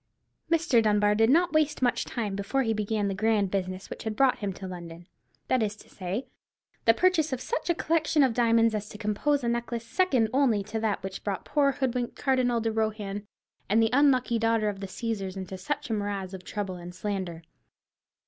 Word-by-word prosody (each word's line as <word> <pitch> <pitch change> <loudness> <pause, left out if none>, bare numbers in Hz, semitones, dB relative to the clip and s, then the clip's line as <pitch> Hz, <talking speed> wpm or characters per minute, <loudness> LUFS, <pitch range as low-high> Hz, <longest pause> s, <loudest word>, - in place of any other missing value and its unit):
Mr. 325 -8 +4
Dunbar 210 -1 +3
did 225 +2 +3
not 345 +5 +4
waste 305 -3 +2
much 245 - +2
time 210 -5 -3
before 200 +7 0
he 225 -2 +1
began 210 -1 -1
the 195 - -1
grand 205 -1 +1
business 185 -1 -3
which - - -8
had 220 -2 -3
brought 265 +1 +3
him 205 -2 -2
to 190 - -9
London—that 175 +7 -5
is 210 -1 -1
to - - -17
say, 190 +7 -4 0.6
the 230 - +7
purchase 345 -3 +2
of 260 - -2
such 465 - -3
a 345 - +3
collection 315 -2 +2
of 260 -3 +3
diamonds 230 -1 +3
as 210 -1 -3
compose 265 +7 0
a - - 0
necklace 235 0 -2
second 260 -7 +2
only 250 -7 +3
to 215 +2 -4
that 215 -4 -1
which 190 0 -6
brought 200 -2 -3
poor 280 -2 +2
hoodwinked 250 -3 -2
Cardinal 255 -3 +1
de 225 0 -1
Rohan 210 -2 -2 0.4
and 215 +3 +4
the 225 -1 +3
unlucky 255 -4 +3
daughter 225 -1 +2
of 200 -2 -5
the 195 - -5
Caesars 195 -2 -4
into 190 0 -6
such 185 +5 -4
a - - +2
morass 200 -2 -3
of 185 -1 -8
trouble 195 -3 -4
and 175 0 -9
slander. 185 -5 -4
220 Hz, 195 wpm, -27 LUFS, 200-255 Hz, 0.6 s, the